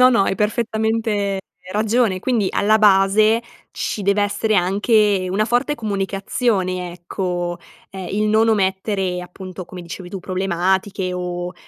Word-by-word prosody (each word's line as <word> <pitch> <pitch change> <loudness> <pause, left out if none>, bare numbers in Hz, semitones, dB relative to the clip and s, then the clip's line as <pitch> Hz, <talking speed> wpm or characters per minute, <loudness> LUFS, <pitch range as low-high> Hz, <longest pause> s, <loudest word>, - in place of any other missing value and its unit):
No, 255 - +8
no 230 -6 +4
hai 195 - 0
perfettamente 220 -2 0 0.3
ragione! 215 -1 +1
Quindi 230 -6 +1
alla 215 +2 +3
base, 210 +2 +4 0.3
ci 210 - -3
dev'essere 205 +2 +1
anche 200 +1 +2
una 215 +3 +1
forte 245 +5 +1
comunicazione 195 -3 -1
ecco, 175 0 -3 0.3
ehm, 190 -2 -7
il 210 +2 0
non 220 +1 +3
omettere 190 -2 0
appunto 185 0 -9
come 180 +1 -9
dicevi 175 +1 -8
tu, 195 - -5
problematiche 190 +1 -1
o 180 0 -4
195 Hz, 130 wpm, -20 LUFS, 185-215 Hz, 0.3 s, No